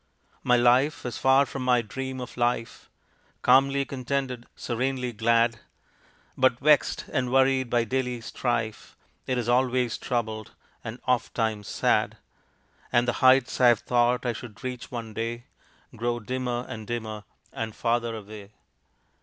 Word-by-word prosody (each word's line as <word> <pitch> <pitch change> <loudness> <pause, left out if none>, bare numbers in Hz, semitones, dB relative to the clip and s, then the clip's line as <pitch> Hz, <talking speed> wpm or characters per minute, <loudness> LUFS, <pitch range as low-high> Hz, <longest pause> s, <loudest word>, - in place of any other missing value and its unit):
My 125 - +3
life 125 +5 +3
is 120 -1 -4
far 135 +1 +5
from 135 -1 -6
my 125 -2 +3
dream 130 +4 -5
of 125 - -8
life 120 -1 -2 0.5
Calmly 135 +2 +4
contented, 130 -2 -3
serenely 125 +1 -2
glad; 115 +1 +2 0.8
But, 130 -2 +3
vexed 150 +1 +3
and 130 -4 0
worried 130 -1 +3
by 120 -1 +2
daily 125 +1 -2
strife, 115 -2 -3 0.3
It 130 - 0
is 120 -2 -2
always 125 -1 +1
troubled, 110 -3 -3 0.3
and 115 +3 -7
ofttimes 110 -4 0
sad - - +1 0.7
And 120 0 +3
the 120 - +2
heights 130 0 +4
I 125 - +7
had 120 -3 +5
thought 120 +1 +1
I 120 - +1
should 115 0 -10
reach 125 -1 -5
one 115 -3 -6
day 115 +2 -3 0.5
Grow 120 +1 -1
dimmer 125 +1 -3
and 110 -2 -7
dimmer, 110 -3 -4 0.3
and 110 -1 -4
farther 120 -1 0
away. 105 -1 -10
120 Hz, 140 wpm, -26 LUFS, 115-130 Hz, 0.8 s, I